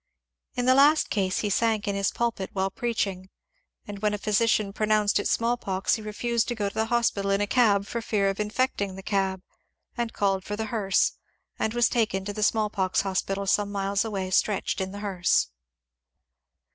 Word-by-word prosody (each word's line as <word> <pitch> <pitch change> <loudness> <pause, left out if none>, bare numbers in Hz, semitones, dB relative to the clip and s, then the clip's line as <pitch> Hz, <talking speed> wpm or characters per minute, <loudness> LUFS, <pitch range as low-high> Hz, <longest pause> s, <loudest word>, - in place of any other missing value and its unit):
In 245 - -1
the 255 - +6
last 290 +3 +4
case 190 -3 0
he 210 - -1
sank 220 0 +1
in 200 - 0
his 200 0 +1
pulpit 230 -5 -2
while 190 0 -1
preach 235 +1 -1
ing, 190 -1 -8 0.6
and 205 -1 -7
when 210 0 0
a - - -4
physician 210 -1 +1
pronounced 215 -1 +2
it - - -1
small 235 +1 +1
pox 190 -3 -1
he 220 - -1
refused 230 +2 -1
to 240 - -2
go 205 -2 -1
to - - -16
the 220 0 0
hospital 230 -4 +1
in 195 0 +2
a 205 - +1
cab 205 -3 +3
for 235 +3 -4
fear 205 -3 0
of 195 +1 -2
infecting 210 -2 -1
the 195 - -9
cab, 190 -2 -1 0.5
and 235 -2 -2
called 195 -3 0
for 205 - -4
the 220 +1 -3
hearse, 200 -3 +2 0.5
and 220 +2 -1
was 240 -1 +4
taken 210 -5 0
to 205 - -4
the 215 - -5
small 215 0 +2
pox 190 -3 0
hospital 195 +1 -2
some 205 +1 +1
miles 200 0 0
away 195 -4 -3
stretched 200 +1 +1
in 190 0 -3
the 205 +1 -7
hearse. 185 - +1
205 Hz, 200 wpm, -26 LUFS, 195-225 Hz, 0.6 s, the